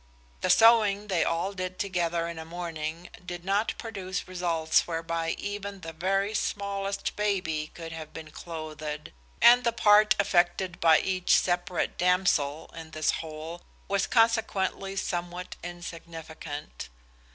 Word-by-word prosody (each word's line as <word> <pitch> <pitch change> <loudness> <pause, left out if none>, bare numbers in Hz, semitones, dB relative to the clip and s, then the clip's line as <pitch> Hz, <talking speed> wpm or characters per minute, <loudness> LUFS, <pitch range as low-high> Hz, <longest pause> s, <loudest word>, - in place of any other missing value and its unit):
The - - 0
sewing 215 -3 +5
they 180 -4 +2
all 170 +4 -1
did 185 -1 -4
together 170 -3 -1
in 170 -1 -6
a - - -5
morning 165 0 -5
did 175 -1 -7
not 200 +3 +1
produce 190 -5 -5
results 170 -3 +1
whereby 165 0 -2
even 200 -1 -5
the 165 -1 -7
very 195 +5 0
smallest 200 -1 -2
baby 180 -7 -1
could 165 -1 -7
have 160 -1 -7
been 155 -1 -9
clothed, 155 -2 -6 0.3
and 245 +1 +8
the 235 - +2
part 210 -2 +5
effected 180 -2 +2
by 160 -2 +6
each 185 -1 +2
separate 175 0 0
damsel 175 -5 +2
in 165 -1 -8
this 155 -1 +1
whole 160 +2 -6 0.3
was 200 -1 +1
consequently 220 -4 +1
somewhat 175 -1 -3
insignificant. 165 - -8
175 Hz, 130 wpm, -28 LUFS, 165-195 Hz, 0.3 s, and